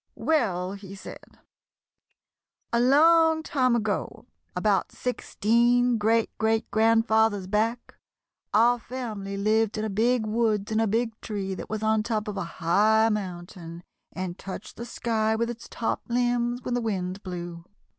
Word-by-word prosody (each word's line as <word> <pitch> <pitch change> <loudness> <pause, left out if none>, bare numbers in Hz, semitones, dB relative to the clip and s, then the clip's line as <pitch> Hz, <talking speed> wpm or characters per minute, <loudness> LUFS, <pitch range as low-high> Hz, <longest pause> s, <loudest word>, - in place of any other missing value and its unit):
"Well," 195 - 0
he 195 -1 -9
said, 195 - -12 1.4
"a 235 - +3
long 320 +5 +5
time 255 -5 +1
ago, 220 -3 -2 0.3
about - - +1
sixteen 240 0 +1
great 225 +2 +1
great 220 0 0
grandfathers 220 -2 +3
back, 220 +5 -2 0.5
our 240 +3 +4
family 215 -6 -5
lived 215 +1 +1
in 215 - -1
a 215 - -3
big 230 +3 +2
woods 215 -2 0
in 215 - +1
a 225 - +2
big 225 +3 0
tree 195 -3 -4
that - - -7
was 215 0 -3
on 220 0 +2
top 215 -1 -2
of 210 - -4
a 195 - -2
high 215 +6 +3
mountain 175 -4 -5 0.3
and 185 -1 -5
touched 195 +1 -8
the 235 - -6
sky 220 -2 0
with 235 +1 -1
its 235 -1 -10
top 230 - -2
limbs 240 0 0
when 250 - -3
the 245 - 0
wind 190 -3 -3
blew. 175 -3 -7
220 Hz, 145 wpm, -26 LUFS, 200-235 Hz, 1.4 s, long